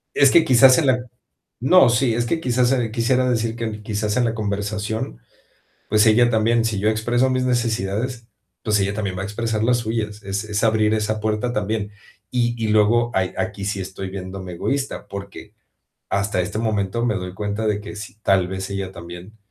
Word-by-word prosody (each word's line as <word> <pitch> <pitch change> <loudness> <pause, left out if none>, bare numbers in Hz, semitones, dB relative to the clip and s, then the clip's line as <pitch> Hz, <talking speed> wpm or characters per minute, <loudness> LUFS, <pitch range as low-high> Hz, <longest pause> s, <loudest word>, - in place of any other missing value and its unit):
Es 140 -2 +6
que 170 - +6
quizás 130 +1 +7
en 155 - +2
la 130 -1 +3 0.6
no, 155 +4 +6
sí, 120 0 +2
es 120 +1 0
que 165 +6 -1
quizás, 125 -3 +2
eh, 120 -4 0
quisiera 125 +3 +1
decir 115 -1 -1
que 110 -2 -4
quizás 105 0 -2
en 125 - +2
la 115 -1 0
conversación, 105 - -3 0.7
pues, 105 -1 +4
ella 120 +2 +5
también, 115 +1 +2
si 110 -3 -1
yo 105 - +2
expreso 120 +4 +1
mis 130 0 0
necesidades, 115 -1 -1 0.4
pues, 105 -2 +2
ella 100 +1 0
también 100 -3 -3
va - - -4
a - - -3
expresar 110 +1 -2
las 120 +2 +3
suyas, 110 -2 -3
es 100 +1 -2
es 105 +1 -1
abrir 110 -1 +3
esa 110 0 -1
puerta 110 +3 -1
también. 105 -1 -2 0.4
Y 120 -1 +1
y 110 - 0
luego, 110 +3 +3
ahí 95 -1 0
aquí 110 -3 -3
sí 100 0 -2
estoy 95 0 -6
viéndome 95 -1 -7
egoísta, 135 +10 -3
porque, 100 +1 -9 0.6
hasta 100 -2 0
este 100 +4 -4
momento 110 0 -1
me 110 -3 +1
doy 90 -1 -5
cuenta 105 +2 -3
de 105 -1 0
que 105 0 -9
sí, 105 0 -9
tal 95 -3 +2
vez 95 0 -4
ella 100 -1 -4
también, 85 +4 -10
110 Hz, 195 wpm, -21 LUFS, 100-120 Hz, 0.7 s, quizás